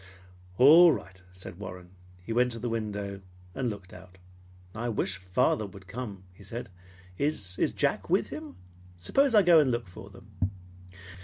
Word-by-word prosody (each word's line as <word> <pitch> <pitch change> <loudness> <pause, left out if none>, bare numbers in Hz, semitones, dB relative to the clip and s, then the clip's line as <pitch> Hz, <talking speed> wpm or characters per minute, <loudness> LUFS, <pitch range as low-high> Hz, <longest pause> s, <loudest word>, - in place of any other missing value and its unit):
"All 160 +6 +9
right," 95 -9 -6
said 90 -1 -9
Warren. 90 -3 -9 0.3
He 115 - -3
went 125 +1 +3
to - - -5
the 120 +1 -3
window 105 -3 -4 0.3
and 130 -3 -1
looked 100 -3 -8
out. 90 0 -14 0.6
"I 115 +2 -3
wish 100 -4 -1
father 95 +3 +1
would 95 0 -13
come," 105 -3 -6
he 100 - -16
said. 115 +4 -6 0.5
"Is 105 -11 -1 0.2
Jack - - 0
with - - +2
him? - - -8 0.4
Suppose 270 - +2
I 210 - +7
go 170 -2 +7
and 145 -4 +3
look 120 -4 -2
for 95 +3 -11
them?" 95 -1 -16
105 Hz, 160 wpm, -28 LUFS, 95-125 Hz, 0.6 s, All